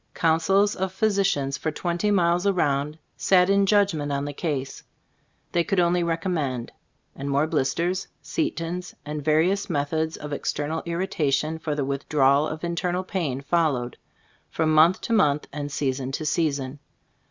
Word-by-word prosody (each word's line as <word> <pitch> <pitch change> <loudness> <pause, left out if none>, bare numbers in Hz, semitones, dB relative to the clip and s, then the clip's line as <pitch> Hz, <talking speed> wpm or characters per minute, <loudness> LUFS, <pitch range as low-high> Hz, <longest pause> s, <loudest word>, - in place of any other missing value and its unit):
Councils 185 +5 +3
of 190 0 -2
physicians 190 -9 +1
for 160 - -1
twenty 175 +5 -1
miles 175 -1 +2
around 150 -5 +1 0.2
sat 185 0 +4
in 200 0 +3
judgment 190 -8 +2
on 140 0 -1
the 145 - -4
case. 140 -4 -3 0.7
They 170 - +2
could 195 +2 0
only 175 0 +3
recommend; 165 -7 -2 0.4
and 140 +1 -5
more 140 +2 +2
blisters, 170 +5 -1 0.2
setons 180 - -3
and 150 0 -4
various 165 +7 +2
methods 160 +1 -1
of 150 -1 -6
external 150 +2 -2
irritation 160 -3 0
for 155 -2 -2
the 145 -2 -1
withdrawal 140 +1 +2
of 155 +1 -6
internal 175 +2 -1
pain 160 -9 -2
followed, 145 -5 0 0.5
from 155 -1 +1
month 165 +4 +5
to 230 - -2
month 150 -9 +2
and 145 0 -4
season 135 -2 -2
to 155 - -3
season. 145 -4 -1
160 Hz, 145 wpm, -25 LUFS, 145-180 Hz, 0.7 s, month